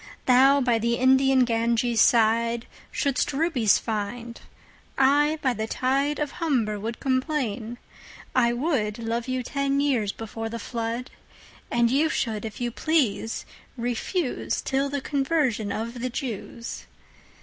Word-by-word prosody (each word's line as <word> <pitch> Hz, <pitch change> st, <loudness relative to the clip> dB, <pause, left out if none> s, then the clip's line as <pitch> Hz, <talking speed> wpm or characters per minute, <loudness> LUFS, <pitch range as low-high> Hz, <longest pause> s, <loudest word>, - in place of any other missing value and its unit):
Thou 270 Hz, +3 st, +5 dB
by 240 Hz, -3 st, +2 dB
the 235 Hz, +1 st, +1 dB
Indian 265 Hz, 0 st, +4 dB
Ganges 235 Hz, 0 st, +1 dB
sideShould'st 235 Hz, +4 st, +1 dB
Rubies 270 Hz, -, +3 dB
find: 230 Hz, +2 st, -4 dB, 0.6 s
I 290 Hz, +3 st, +4 dB
by 260 Hz, -2 st, +2 dB
the 220 Hz, -1 st, -3 dB
TideOf 275 Hz, +4 st, 0 dB
Humber 235 Hz, -10 st, 0 dB
would 225 Hz, +3 st, -5 dB
complain. 255 Hz, -4 st, -1 dB, 0.6 s
I 240 Hz, -2 st, +3 dB
wouldLove 235 Hz, -3 st, -1 dB
you 255 Hz, 0 st, -1 dB
ten 275 Hz, +2 st, 0 dB
years 255 Hz, -8 st, +1 dB
before 225 Hz, +1 st, -6 dB
the 230 Hz, -, -5 dB
Flood:And 235 Hz, 0 st, -4 dB
you 300 Hz, +4 st, +3 dB
should 220 Hz, -6 st, -2 dB
if 215 Hz, -2 st, -7 dB
you 240 Hz, -1 st, -2 dB
please 240 Hz, -7 st, 0 dB, 0.3 s
refuseTill 265 Hz, +2 st, -1 dB
the 285 Hz, 0 st, -3 dB
Conversion 270 Hz, -7 st, 0 dB
of 230 Hz, +3 st, -4 dB
the 255 Hz, -, -1 dB
Jews. 235 Hz, -2 st, -6 dB
245 Hz, 115 wpm, -25 LUFS, 230-275 Hz, 0.6 s, Thou